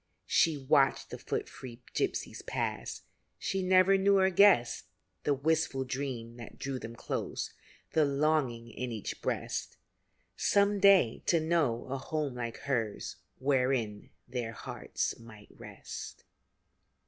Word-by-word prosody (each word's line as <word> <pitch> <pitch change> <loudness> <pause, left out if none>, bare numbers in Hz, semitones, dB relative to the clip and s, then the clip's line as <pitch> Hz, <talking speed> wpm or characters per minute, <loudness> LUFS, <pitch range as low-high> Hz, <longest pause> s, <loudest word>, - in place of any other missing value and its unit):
She 160 -2 +3
watched 135 0 +2
the - - -6
foot - - -3
free 120 -1 -10
gypsies - - -2
pass; - - -3 0.3
She 195 - -1
never 185 +1 +5
knew 200 +1 +4
or 190 0 +4
guessed 180 - +5 0.4
The 145 - +3
wistful 150 -1 +1
dream 125 -3 -4
that 115 -2 -10
drew 135 -1 -3
them 115 0 -8
close - - -4 0.4
The 160 - +4
longing 140 -5 +1
in 125 +2 -4
each 110 -3 -5
breast - - -3 0.6
Some 200 0 +3
day 190 - +5
to 170 - +4
know 155 -8 +1
a 135 +1 -4
home 150 -1 -2
like 120 -2 -4
hers, 115 -7 -2 0.2
Wherein 125 -6 0 0.2
their 120 -3 -3
hearts - - -4
might 110 -3 -14
rest. - - -9
135 Hz, 130 wpm, -31 LUFS, 120-160 Hz, 0.6 s, never